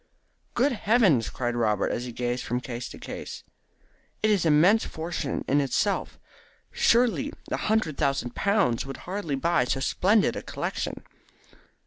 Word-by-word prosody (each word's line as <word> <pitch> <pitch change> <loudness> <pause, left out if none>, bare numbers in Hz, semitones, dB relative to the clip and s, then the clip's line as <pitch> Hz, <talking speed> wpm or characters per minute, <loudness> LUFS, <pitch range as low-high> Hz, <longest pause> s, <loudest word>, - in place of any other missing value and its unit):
"Good 270 +4 +3
heavens!" 205 - +3
cried 120 -1 -3
Robert, 105 -4 +1
as 120 - -3
he 125 - -6
gazed 120 +1 -2
from 125 +1 -2
case 125 -1 -6
to - - -10
case. - - -7 0.8
"It 215 - +4
is 190 -5 +2
an 155 - +5
immense 190 +9 +5
fortune 160 -3 -4
in 145 +2 +3
itself. 170 +9 -1 0.5
Surely 245 +4 +2 0.2
a - - 0
hundred 215 -9 0
thousand 135 -3 0
pounds 200 - +1
would 135 - -7
hardly 180 -6 -3
buy 150 -2 +1
so 135 - -1
splendid 200 +9 +2
a - - -4
collection." - - -4
155 Hz, 150 wpm, -26 LUFS, 125-205 Hz, 0.8 s, an